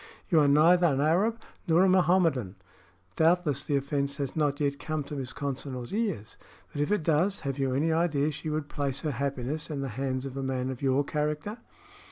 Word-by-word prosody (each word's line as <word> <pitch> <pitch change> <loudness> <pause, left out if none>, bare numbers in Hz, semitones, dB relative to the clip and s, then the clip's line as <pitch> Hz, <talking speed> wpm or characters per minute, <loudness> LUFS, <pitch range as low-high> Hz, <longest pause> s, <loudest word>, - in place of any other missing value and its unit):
You 165 -5 +5
are 145 - +4
neither 170 +5 +5
an 135 -4 +1
Arab 190 +10 +2 0.3
nor 170 +2 +5
a - - +5
Mohammedan. 175 - +2 0.6
Doubtless 160 -4 +3
the 145 - -1
offense 140 0 -1
has 140 -3 -3
not 145 -2 0
yet 140 -1 -1
come 155 0 -3
to 145 - -7
Miss 130 -2 -5
Consinor's 135 -2 -5
ears; 200 - -2 0.4
but 145 - -2
if 145 - 0
it 210 -6 +1
does, 170 +6 +1
have 140 -2 -3
you 135 -1 0
any 155 +4 +1
idea 155 -3 +1
she 150 +2 -5
would 155 -1 -2
place 140 -2 -2
her 155 - -1
happiness 140 +3 -3
in 145 -3 -3
the 135 - -3
hands 130 +2 -3
of 135 -1 -6
a 135 - -3
man 130 -1 -2
of 130 - -8
your 135 +1 +2
character?" 150 +9 -3
145 Hz, 205 wpm, -28 LUFS, 135-160 Hz, 0.6 s, You